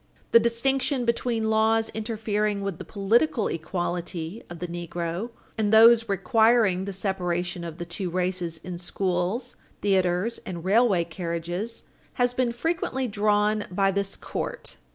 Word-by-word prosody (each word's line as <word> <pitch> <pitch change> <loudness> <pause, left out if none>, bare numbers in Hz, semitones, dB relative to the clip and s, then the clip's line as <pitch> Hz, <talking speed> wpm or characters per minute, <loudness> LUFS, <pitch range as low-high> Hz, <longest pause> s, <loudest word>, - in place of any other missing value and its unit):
The 230 - +8
distinction 250 +3 +1
between 230 -1 0
laws 220 +1 +3
interfering 215 -2 -1
with 195 -4 -4
the - - -5
political 225 +4 +1
equality 175 +2 -3
of 175 - -7
the 180 - -4
negro 175 +4 -4 0.3
and 210 -1 +1
those 230 +1 +7
requiring 205 0 +3
the 200 - -4
separation 180 -2 -2
of 165 -1 -6
the 175 - -5
two 175 +2 -4
races 180 -2 -2
in 180 -1 -6
schools, 185 +6 -2 0.3
theatres 190 +2 +1
and 180 -6 -6
railway 200 -3 +4
carriages 175 +5 -4 0.3
has 245 0 +1
been 250 -1 +1
frequently 265 -1 -1
drawn 210 0 +1
by 195 +2 +2
this 195 0 -1
court. - - -5
200 Hz, 135 wpm, -26 LUFS, 175-230 Hz, 0.3 s, The